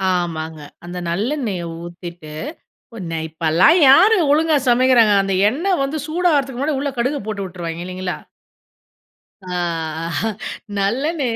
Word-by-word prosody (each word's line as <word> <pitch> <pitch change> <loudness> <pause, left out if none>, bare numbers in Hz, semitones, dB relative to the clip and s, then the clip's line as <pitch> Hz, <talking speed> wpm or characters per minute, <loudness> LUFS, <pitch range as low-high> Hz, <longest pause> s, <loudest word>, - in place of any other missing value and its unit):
ஆமாங்க. 160 -3 -3 0.3
அந்த 175 +1 -7
நல்லெண்ணெய 210 - -2 0.2
ஊத்திட்டு 175 -2 -9 0.6
உன 170 -6 -5
இப்பலாம் 165 - +4
யாரு 420 +11 +7
ஒழுங்கா 310 +1 +3
சமைக்கிறாங்க. 240 -3 +5
அந்த 195 0 -1 0.2
எண்ணெய் 345 - 0
வந்து 275 +3 -2
சூடாகறதுக்கு 310 -6 +1
முன்னாடி, 285 +1 0
உள்ள 285 +1 -1
கடுகு 265 +5 0
போட்டு 210 -2 -4
வுட்டுருவாய்ங்க 170 -2 -6
இல்லைங்களா? 185 0 -4 1.3
அ - - -11 0.6
அஹ. 165 -3 -2 0.6
நல்லனே 265 +8 0
215 Hz, 115 wpm, -20 LUFS, 175-285 Hz, 1.3 s, யாரு